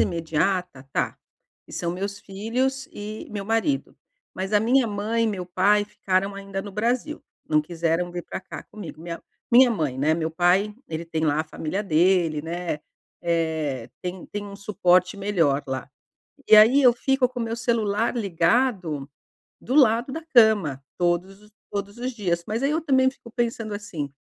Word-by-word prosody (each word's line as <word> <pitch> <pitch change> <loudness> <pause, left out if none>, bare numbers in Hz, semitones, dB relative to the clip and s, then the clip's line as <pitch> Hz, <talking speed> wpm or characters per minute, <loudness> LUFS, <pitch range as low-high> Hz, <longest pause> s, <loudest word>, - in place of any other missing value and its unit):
imediata 170 -1 0
tá, - - -1 0.5
que - - -15
são 170 - -2
meus 200 +2 -4
filhos 235 +7 -2
e 210 +1 -7
meu 205 -2 -4
marido. 225 +7 0 0.4
Mas 190 +2 -4
a 210 - +5
minha 245 +3 +3
mãe 215 +2 -1
e - - +2
meu 195 -4 -2
pai 205 +3 +3
ficaram 195 -1 -1
ainda 195 -1 -5
no 205 - -8
Brasil, 245 +9 -1 0.3
não 155 -1 +4
quiseram 165 +2 -1
vir 175 0 -5
pra - - -6
cá - - -9
comigo. 185 -7 -10
Minha 170 0 -6 0.3
minha 245 +1 +8
mãe, 155 - -1
né, 155 +3 +3
meu 160 -1 -2
pai 180 +5 +2
ele 160 +1 -4
tem 160 -1 -2
lá 150 0 +2
a - - -3
família 160 +5 -4
dele, 170 -3 +2
né, 170 -2 -3 0.4
eh, 160 -7 -1
tem 180 0 -5
tem 205 0 -5
um 200 -1 -9
suporte 185 -2 +2
melhor 170 -9 +1
lá. 130 0 -4 0.6
E - - +8
aí 230 +7 +7
eu 250 -2 +7
fico 265 +1 +2
com 250 -1 -7
o - - 0
meu 230 0 -3
celular 225 -1 0
ligado, 180 - +1 0.5
do 255 - -2
lado 245 -2 +4
da 325 +2 -5
cama, 205 - +5 0.2
todos 180 +3 0
os 210 0 -20 0.2
todos 200 +1 -5
os 250 +2 -3
dias. 175 -6 -1
Mas 225 +4 -2
aí 280 - +2
eu 320 +2 0
também 260 -3 +3
fico 255 -3 -15
pensando 230 -3 -1
assim: 195 -9 -5
200 Hz, 175 wpm, -24 LUFS, 170-225 Hz, 0.6 s, minha